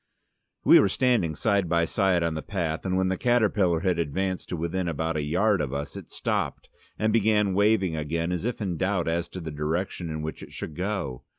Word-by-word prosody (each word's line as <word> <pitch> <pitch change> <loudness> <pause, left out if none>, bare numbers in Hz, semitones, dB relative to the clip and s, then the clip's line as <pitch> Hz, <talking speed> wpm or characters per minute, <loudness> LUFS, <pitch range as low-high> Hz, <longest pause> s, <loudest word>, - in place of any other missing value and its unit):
We - - +8
were 100 - +4
standing 115 -9 +1
side 100 -3 +1
by 85 0 +3
side 95 -1 +1
on 85 -1 0
the 80 - -3
path, 90 -5 -3
and 95 0 +1
when 95 0 +2
the 95 - -2
caterpillar 105 -8 +2
had 90 -2 +1
advanced 95 +4 -2
to 90 - -3
within 85 +3 -2
about 80 0 -2
a 75 - 0
yard 95 +7 +2
of 70 -2 -3
us, 70 0 -5
it - - -9
stopped, - - -2 0.3
and 110 0 +1
began 105 -3 +3
waving 100 -3 +2
again 80 +3 -2
as 90 -1 -2
if 120 0 -3
in 90 -5 -2
doubt 95 -2 0
as 85 +1 -1
to 95 - -7
the 80 -3 -6
direction 80 +4 -2
in 80 -1 -4
which 80 - -5
it - - -10
should 75 - -6
go. 90 -9 -3
90 Hz, 215 wpm, -26 LUFS, 80-100 Hz, 0.3 s, We